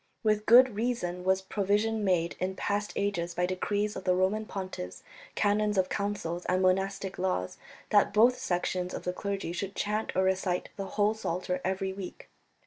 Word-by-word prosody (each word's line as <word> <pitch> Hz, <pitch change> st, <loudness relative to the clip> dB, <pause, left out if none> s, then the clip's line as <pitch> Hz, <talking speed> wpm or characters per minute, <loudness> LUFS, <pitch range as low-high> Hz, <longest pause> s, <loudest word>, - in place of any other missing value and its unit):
With 215 Hz, -1 st, +1 dB
good 245 Hz, 0 st, +7 dB
reason 205 Hz, -6 st, -2 dB
was 190 Hz, +1 st, +2 dB
provision 210 Hz, +3 st, 0 dB
made 175 Hz, -3 st, +1 dB
in 190 Hz, +1 st, -2 dB
past 205 Hz, +2 st, -1 dB
ages 175 Hz, -4 st, -1 dB
by 180 Hz, -, +1 dB
decrees 205 Hz, +3 st, -1 dB
of -, -, -6 dB
the 180 Hz, -1 st, +2 dB
Roman 200 Hz, +4 st, +1 dB
pontiffs, 185 Hz, -, -6 dB, 0.3 s
canons 210 Hz, 0 st, +2 dB
of 185 Hz, -1 st, +2 dB
councils, 200 Hz, -4 st, -2 dB
and 185 Hz, +1 st, +1 dB
monastic 195 Hz, +1 st, 0 dB
laws 180 Hz, -, -1 dB, 0.3 s
that 205 Hz, -1 st, +5 dB
both 230 Hz, +5 st, +5 dB
sections 180 Hz, -5 st, -1 dB
of -, -, -6 dB
the 180 Hz, -, -2 dB
clergy 200 Hz, -2 st, -3 dB
should 195 Hz, +3 st, -4 dB
chant 210 Hz, +1 st, -1 dB
or 190 Hz, -, +3 dB
recite 190 Hz, -1 st, 0 dB
the 195 Hz, -, -4 dB
whole 210 Hz, +1 st, +4 dB
Psalter 180 Hz, -3 st, -3 dB
every 190 Hz, 0 st, -1 dB
week." 190 Hz, -2 st, -8 dB
195 Hz, 170 wpm, -29 LUFS, 185-210 Hz, 0.3 s, good